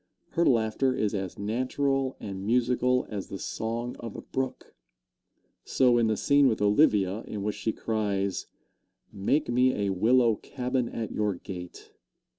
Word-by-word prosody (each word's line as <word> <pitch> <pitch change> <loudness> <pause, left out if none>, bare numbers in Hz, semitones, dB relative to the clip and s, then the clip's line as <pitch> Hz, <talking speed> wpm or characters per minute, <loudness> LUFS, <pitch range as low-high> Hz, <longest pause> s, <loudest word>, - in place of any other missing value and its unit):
Her 170 - +1
laughter 120 +2 +2
is 105 -1 0
as 95 -3 -4
natural 130 +5 -1
and 95 -2 -6
musical 125 +3 +2
as 100 -2 -4
the 95 - -6
song 115 +4 -4
of 115 -3 -7
a - - -7
brook. 130 -1 -4 0.9
So, 125 -2 +3
in 115 - +3
the 110 -1 +1
scene 140 +4 +4
with 115 - +1
Olivia 105 -2 +3
in 105 -2 -5
which 105 0 -2
she 110 - -1
cries, 100 -4 -2 0.7
"Make 100 +10 +1
me 125 +2 +3
a 100 - 0
willow 115 +3 +3
cabin 125 -2 -2
at 110 -3 -4
your 105 -2 0
gate!" 90 -1 -9
115 Hz, 150 wpm, -28 LUFS, 100-125 Hz, 0.9 s, scene